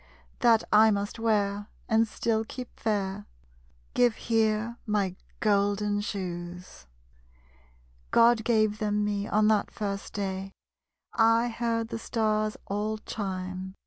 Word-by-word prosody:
That 230 -2 +5
I 220 +1 +7
must 205 +2 -2
wear, 205 -2 0 0.2
and 225 0 +3
still 220 0 0
keep 250 +2 -9
fair. 205 -2 -2 0.7
Give 240 -3 +3
here 225 0 0
my 200 -3 0 0.3
golden 205 0 +2
shoes. 180 - -6 1.2
_God 230 -1 +5
gave 215 -2 +2
them 210 -1 0
me, 205 0 -1
on 215 0 +3
that 210 -2 +2
first 200 -1 -4
day 195 -1 -4 0.6
I 230 +1 +4
heard 230 -1 -1
the 230 - -4
Stars 215 -2 0
all 210 +2 -2
chime. 190 -3 -5
210 Hz, 115 wpm, -28 LUFS, 200-225 Hz, 1.2 s, I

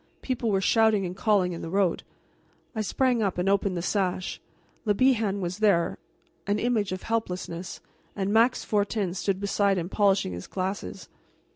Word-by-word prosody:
People 250 -3 -1
were 195 -2 +2
shouting 220 -1 +3
and 180 0 -5
calling 190 -3 +2
in 165 - -6
the 165 - -5
road. 190 -1 +1 0.7
I 220 - 0
sprang 245 +3 +1
up 195 -4 0
and 180 +2 0
opened 195 -2 +1
the 170 - -3
sash. 185 -2 -1 0.4
Le 210 -2 +1
Bihan 220 -5 +2
was 180 +2 -3
there, 200 -6 +2 0.5
an 205 +1 +1
image 220 -4 0
of 185 - -4
helplessness, 185 -5 -3 0.3
and 200 0 -1
Max 230 +3 +4
Fortin 205 -3 0
stood 190 0 -1
beside 200 -1 +1
him 175 0 -3
polishing 195 - +2
his 90 +1 -7
glasses. 185 - -4
200 Hz, 165 wpm, -27 LUFS, 185-215 Hz, 0.7 s, Max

